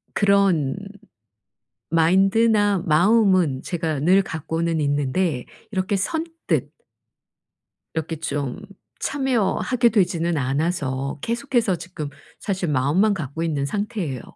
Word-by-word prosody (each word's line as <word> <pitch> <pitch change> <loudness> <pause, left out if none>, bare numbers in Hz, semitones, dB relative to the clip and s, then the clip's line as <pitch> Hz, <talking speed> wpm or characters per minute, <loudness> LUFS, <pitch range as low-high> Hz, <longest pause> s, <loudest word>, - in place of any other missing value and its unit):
그런 195 -9 +3 1.1
마인드나 195 +5 +3
마음은 180 - +3
제가 160 -4 -2
늘 185 +6 +4
갖고는 165 +1 -2
있는데 145 0 0 0.3
이렇게 190 0 0
선뜻 325 - -2 1.2
이렇게 160 0 -3
좀 145 -4 -3 0.4
참여하게 250 -2 +1
되지는 175 -6 +1
않아서 140 -1 -1
계속해서 235 -4 0
지금 165 -4 -7 0.3
사실 190 -4 -2
마음만 150 +10 +2
갖고 160 -3 -4
있는 150 -4 -1
상태예요. 175 - -3
175 Hz, 235 characters per minute, -22 LUFS, 150-205 Hz, 1.2 s, 늘